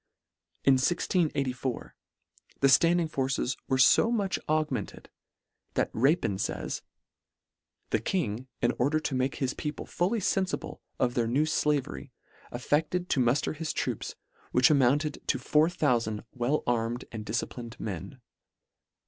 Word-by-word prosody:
In 135 - +6
1684, 135 -5 -1 0.6
the 135 - +4
flanding 170 +4 +4
forces 135 -3 -1
were 130 - +1
fo 135 - +6
much 205 -5 0
augmented, 155 -8 -2 0.6
that - - +1
Rapin 120 - +2
fays - - -3 0.4
— - - -62
" - - -53
The 110 - +2
King, 125 - -2 0.2
in - - +4
order 145 +5 +2
to 150 - -3
make 130 +1 0
his 130 -2 -1
people 150 0 -5
fully 190 +7 0
fenfible 190 -1 -1 0.2
of 120 -1 +1
their 120 -2 +1
new 135 +6 +2
flavery, 145 - -1 0.4
aflecled 155 +8 0
to 140 - +2
mufter 125 +5 +1
his 160 +1 -3
troops, - - -3 0.4
which 125 +4 +5
amounted 145 +2 +2
to - - +2
4000 125 -9 +1
well 130 +4 0
armed 120 +1 -1
and 110 -2 -5
disciplined 115 +2 -4
men." 95 +5 -6
135 Hz, 130 wpm, -29 LUFS, 120-155 Hz, 0.6 s, In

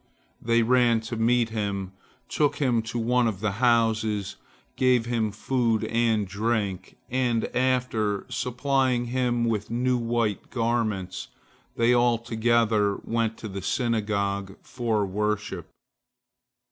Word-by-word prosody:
They 115 0 +2
ran 120 -1 +3
to 115 +1 -5
meet 115 +1 +2
him, 100 -3 -3 0.4
took 145 -2 +1
him 125 -5 +1
to 115 +2 -5
one 120 +1 +2
of 105 -5 -2
the 110 0 0
houses, 110 -4 +2 0.4
gave 125 -3 +3
him 115 -3 0
food 115 +1 0
and 115 -3 +1
drink, 100 -2 -2
and, 120 -3 0
after 125 -5 0
supplying 125 -1 0
him 120 -2 +1
with 110 -3 -1
new 125 +2 +1
white 115 -3 -1
garments, 110 -6 -1 0.5
they 115 +1 +3
all 120 -1 +3
together 115 -3 +1
went 115 -1 -1
to 110 - -7
the 100 -1 -6
synagogue 100 -3 -1
for 115 -4 -1
worship. 105 +2 -2
115 Hz, 120 wpm, -26 LUFS, 105-120 Hz, 0.5 s, ran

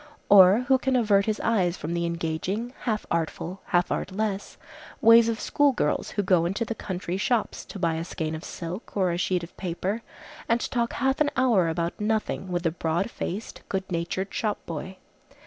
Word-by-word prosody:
Or 195 +2 +8
who 265 -1 +4
can 265 0 0
avert 210 -4 +3
his 215 -1 0
eyes 185 -6 +1
from 160 +3 -4
the 170 0 0
engaging, 170 +8 -3
half 215 -3 -1
artful, 170 +2 -2
half 175 -1 +1
artless 200 0 -2 0.4
ways 230 0 +7
of 225 -1 -2
school 290 -1 +2
girls 150 -10 0
who 205 - -1
go 180 -3 +3
into 200 +6 -1
the 230 - -3
country 185 -4 -4
shops 225 +3 0
to - - -9
buy 170 -3 +1
a 160 +1 -2
skein 160 -2 -4
of 160 +1 -6
silk 180 +6 -7
or 185 -3 +2
a 170 - -2
sheet 180 -1 0
of 170 - -10
paper, 190 +4 -2 0.5
and 230 +1 +3
talk 235 -2 0
half 265 +2 0
an 295 - +4
hour 225 -10 +3
about 170 +4 -2
nothing 210 -3 -1
with 175 -1 -1
the 165 - +1
broad 170 +6 -1
faced, 205 +6 -5
good 190 -1 -1
natured 180 +3 -2
shop 210 -2 -1
boy. 175 +4 -6
190 Hz, 190 wpm, -26 LUFS, 170-225 Hz, 0.5 s, Or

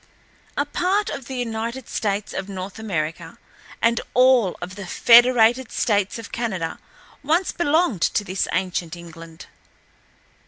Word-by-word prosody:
A 285 - +1
part 370 +7 0
of 265 - -6
the 265 - -6
United 235 +1 -4
States 205 -1 -2
of 195 +1 -5
North 190 +1 -7
America 165 -5 -4 0.5
and 230 0 +3
all 250 -6 +4
of 180 +1 -7
the 195 -1 -8
Federated 240 +2 +5
States 205 -3 0
of 230 - -9
Canada 190 -9 -3 0.4
once 325 +6 +1
belonged 315 - +1
to 205 - +1
this 190 -1 -2
ancient 180 -2 -2
England." 165 -1 -12
220 Hz, 130 wpm, -22 LUFS, 185-255 Hz, 0.5 s, Federated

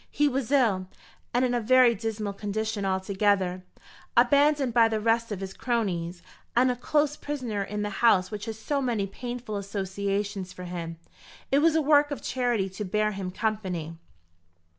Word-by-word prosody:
He 295 - +2
was 270 -2 -2
ill, 215 -10 +3 0.4
and 245 +2 +2
in 245 - 0
a 240 - +1
very 250 +1 +5
dismal 215 -1 -3
condition 210 0 -3
altogether, 190 -1 +1 0.5
abandoned 280 +1 +4
by 230 -1 +6
the 220 -1 -1
rest 230 +1 +1
of 200 -2 -4
his 195 0 -5
cronies, 180 -8 -2 0.3
and 250 +1 +4
a - - -2
close 295 +4 +1
prisoner 255 -9 -4
in 210 +1 -3
the 210 - -3
house 210 -6 +4
which 210 -1 -5
has 225 -2 -5
so 280 +6 -1
many 235 -6 0
painful 240 +1 -5
associations 200 0 -3
for 180 - -9
him. 170 -2 -5 0.5
It 275 - +5
was 320 +1 +4
a 320 - +3
work 290 0 +5
of 285 - -5
charity 245 -6 0
to 190 +3 -6
bear 215 +2 0
him 195 -2 -4
company." 185 -6 -3
215 Hz, 170 wpm, -27 LUFS, 195-245 Hz, 0.5 s, by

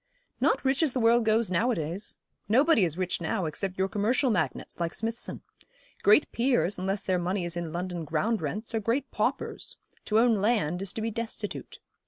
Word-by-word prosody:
'Not - - +2
rich 265 +3 +2
as 305 -6 +2
the 255 - 0
world 230 0 +4
goes 220 -2 +2
nowadays. 180 -2 -1 0.3
Nobody 265 - +5
is 165 -2 -1
rich 185 -1 -1
now, 180 +3 -1
except 185 +5 -3
your 190 0 +2
commercial 235 +6 +1
magnates, 170 -3 -2
like 170 -1 -2
Smithson. 225 +2 -4 0.6
Great 210 +8 +5
peers, 235 -6 +1
unless 195 +2 -1
their 185 -1 +1
money 180 +1 -1
is 170 0 -2
in 170 -2 -3
London 175 0 -3
ground 165 +9 0
rents, 220 +2 -4
are 225 - +1
great 235 +6 -1
paupers. - - -2 0.3
To 215 - +2
own 230 -1 +5
land 200 -6 +1
is 195 -2 -3
to 225 - -4
be 225 - -1
destitute. 225 -2 -5
210 Hz, 185 wpm, -28 LUFS, 180-230 Hz, 0.6 s, Nobody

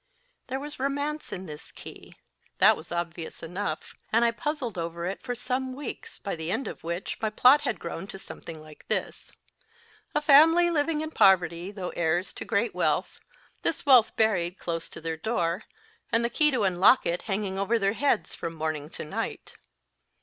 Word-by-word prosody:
There 265 +1 -3
was 295 0 -7
romance 285 +3 -2
in 190 0 -5
this 150 -3 -10
key - - -12 0.4
that - - +6
was 160 - -11
obvious 170 -1 -4
enough, 175 -2 -4 0.2
and 230 +2 +4
I 235 - +4
puzzled 285 - -3
over 170 0 -4
it 190 +2 -4
for 245 -1 -4
some 255 +2 -2
weeks, 275 0 -7
by 200 - -4
the 160 0 -5
end 270 - -1
of - - -8
which 170 +3 -4
my 220 - +1
plot 255 +7 +6
had 230 - -2
grown 170 +2 -6
to 195 - -8
something 165 -4 -9
like 155 -1 -15
this: - - -3 0.8
A - - +4
family 325 +4 +7
living 305 0 +1
in 315 0 -4
poverty, 175 - +4
though 195 -3 -5
heirs 170 +2 0
to - - -6
great 225 +1 0
wealth - - 0 0.4
this 325 - -1
wealth 255 -5 +6
buried 185 -5 +2
close 165 -1 -4
to - - -10
their 160 0 -3
door, 180 -1 -1 0.5
and 230 +1 +2
the 235 - -1
key 300 +4 +4
to 255 -6 0
unlock 190 +7 +5
it 170 +1 0
hanging 195 -1 -1
over 220 +4 +2
their 200 -2 +1
heads 230 - +1
from 165 0 -5
morning 155 -2 -3
to - - -7
night. 150 - -4
200 Hz, 185 wpm, -27 LUFS, 170-260 Hz, 0.8 s, family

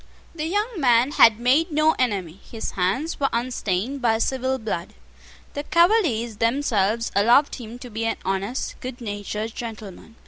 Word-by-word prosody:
The 315 -1 -3
young 415 +3 -1
man 250 -1 +4
had 225 -6 +6
made 280 +8 +2
no 305 +1 +4
enemy. 195 -8 -1
His 225 - -5
hands 195 - -1
were 275 -1 +1
unstained 235 +1 -2
by 225 -2 +2
civil 260 +2 -1
blood. 210 -7 -5 0.6
The 285 - -3
Cavaliers 310 - +2
themselves 230 -3 +1
allowed 240 +8 +4
him 235 -2 -8
to 245 -1 -10
be 225 +1 -3
an 225 - -1
honest, 195 +7 -3
good 255 0 -7
natured 210 0 -5
gentleman. 225 -2 -8
235 Hz, 150 wpm, -23 LUFS, 215-275 Hz, 0.6 s, had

